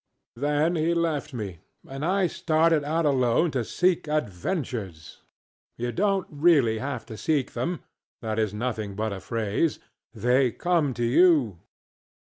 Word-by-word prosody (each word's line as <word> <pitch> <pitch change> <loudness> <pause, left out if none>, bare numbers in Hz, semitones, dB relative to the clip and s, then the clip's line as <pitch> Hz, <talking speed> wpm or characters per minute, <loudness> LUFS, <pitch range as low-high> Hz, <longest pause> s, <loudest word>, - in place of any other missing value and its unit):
ŌĆØ 120 - -14
Then 150 +4 +1
he 165 +2 +1
left 160 -3 -1
me, 100 -9 -6 0.3
and 135 +2 -6
I 190 +3 +2
started 160 -2 +2
out 160 +3 0
alone 135 +3 +2
to 130 -4 -1
seek 180 +6 +1
adventures. 110 - -3 0.6
You 120 +1 -2
donŌĆÖt 195 0 +1
really 145 -8 +3
have 135 -2 -4
to 115 - -9
seek 140 +5 0
themŌĆöthat 115 -9 -5
is 110 -3 +1
nothing 105 -2 -3
but 110 0 -2
a - - -5
phraseŌĆöthey 115 - -1
come 165 -7 +1
to 120 - -2
you. 125 - +4
135 Hz, 135 wpm, -26 LUFS, 110-165 Hz, 0.6 s, you